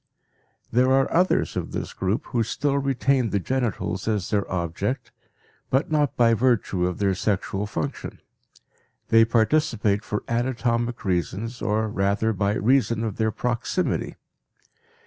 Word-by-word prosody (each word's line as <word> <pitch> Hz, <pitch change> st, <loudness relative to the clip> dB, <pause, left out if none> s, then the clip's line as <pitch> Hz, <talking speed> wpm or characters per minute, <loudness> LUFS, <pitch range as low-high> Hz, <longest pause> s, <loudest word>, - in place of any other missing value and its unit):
There 125 Hz, +3 st, +3 dB
are 135 Hz, 0 st, +3 dB
others 180 Hz, +2 st, +2 dB
of -, -, -4 dB
this -, -, -4 dB
group 100 Hz, +9 st, -1 dB
who 120 Hz, -3 st, -1 dB
still 140 Hz, +5 st, 0 dB
retain 135 Hz, -2 st, +1 dB
the 100 Hz, -, 0 dB
genitals 115 Hz, -3 st, -2 dB
as 105 Hz, -5 st, -1 dB
their 100 Hz, -2 st, 0 dB
object, 90 Hz, +7 st, -2 dB, 0.6 s
but 135 Hz, +4 st, +1 dB
not 150 Hz, -4 st, +1 dB
by 115 Hz, -1 st, +5 dB
virtue 115 Hz, -6 st, +1 dB
of 90 Hz, -, -3 dB
their 100 Hz, -1 st, +1 dB
sexual 100 Hz, +1 st, -1 dB
function; 135 Hz, +5 st, -4 dB, 0.9 s
they 115 Hz, 0 st, +6 dB
participate 110 Hz, -3 st, +1 dB
for 105 Hz, -, -3 dB
anatomic 120 Hz, -1 st, -1 dB
reasons 100 Hz, +6 st, -2 dB
or 110 Hz, +1 st, 0 dB
rather 100 Hz, +2 st, 0 dB
by 100 Hz, +1 st, 0 dB
reason 115 Hz, -1 st, +2 dB
of 110 Hz, -3 st, -3 dB
their 110 Hz, -1 st, +1 dB
proximity. 120 Hz, -, -2 dB
115 Hz, 135 wpm, -24 LUFS, 100-130 Hz, 0.9 s, they